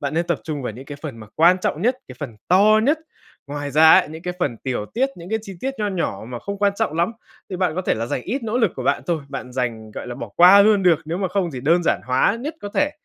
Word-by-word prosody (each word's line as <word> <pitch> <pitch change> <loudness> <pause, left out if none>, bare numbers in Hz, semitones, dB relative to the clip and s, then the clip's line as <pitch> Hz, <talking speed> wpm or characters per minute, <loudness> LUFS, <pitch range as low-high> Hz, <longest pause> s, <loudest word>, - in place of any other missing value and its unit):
Bạn 140 0 -3
nên 170 +1 0
tập 170 -3 -1
trung 150 -4 -4
vào 115 - -4
những 125 +5 -10
cái 145 +1 -8
phần 145 -7 -6
mà 110 - -10
quan 175 +3 +5
trọng 175 -2 -2
nhất, 250 +3 +2
cái - - -10
phần 120 -7 -6
to 210 +4 +5
nhất. 300 +4 +2 0.5
Ngoài 145 0 -5
ra 160 +3 +6
ấy, - - -8
những 160 +2 -9
cái 180 0 -4
phần 140 -9 -1
tiểu 120 -3 -4
tiết, 260 +4 +2
những 175 +2 -10
cái 220 - +1
chi 195 -3 -9
tiết 270 +1 -3
nho 210 -1 0
nhỏ 170 - -3
mà 125 -1 -5
không 200 +9 -6
quan 200 0 +2
trọng 155 - -1
lắm 170 +7 +1 0.4
thì 185 - -3
bạn 180 -3 0
có 185 - -2
thể - - +1
là 115 +1 -3
dành 125 - -3
ít 255 +6 -3
nỗ 225 +2 -1
lực 230 - +2
của - - -4
bạn - - +1
thôi, 165 -5 -1
bạn 135 -2 -7
dành 115 -4 -3
gọi - - -7
là, 120 - -5
bỏ 115 - -7
qua 185 +3 +8
luôn 210 -2 +4
được, 175 -4 +4
nếu 165 +3 -3
mà 190 -1 -1
không 180 -1 -1
thì 130 - -5
đơn 165 +6 +3
giản - - +1
hóa 130 - +2
nhất 300 +5 -4
có 205 - -5
thể. 295 0 +2
170 Hz, 300 wpm, -21 LUFS, 135-200 Hz, 0.5 s, qua